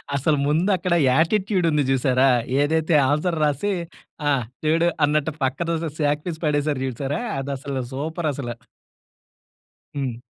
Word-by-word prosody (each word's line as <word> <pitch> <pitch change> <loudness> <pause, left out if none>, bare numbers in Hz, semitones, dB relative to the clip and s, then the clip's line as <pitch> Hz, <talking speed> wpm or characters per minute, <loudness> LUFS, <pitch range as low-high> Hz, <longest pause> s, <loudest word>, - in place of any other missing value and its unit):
అసలు 145 +2 +2
ముందు 160 +7 +2
అక్కడ 175 0 -1 0.2
యాటిట్యూడ్ 185 +6 +2
ఉంది 150 -1 +2
చూసారా, 130 0 +3 0.3
ఏదైతే 160 +2 +2 0.2
ఆన్సర్ 160 +3 0
రాసి 150 +8 +1 0.6
ఆ! - - +4 0.3
చూడు 165 +2 +3 0.2
అన్నట్టు 150 +1 0
పక్కఅదో 165 +6 0 0.3
సాక్‌పీస్ 150 +3 -1
పడేశారు 145 -2 0
చూసారా! 135 - -3 0.2
అది 135 +1 -4
అసలు 135 -1 -4
సూపర్ 160 +4 -2
అసల. 130 -3 -5 1.4
హ్మ్. 135 -4 -2
150 Hz, 120 wpm, -23 LUFS, 140-165 Hz, 1.4 s, ఆ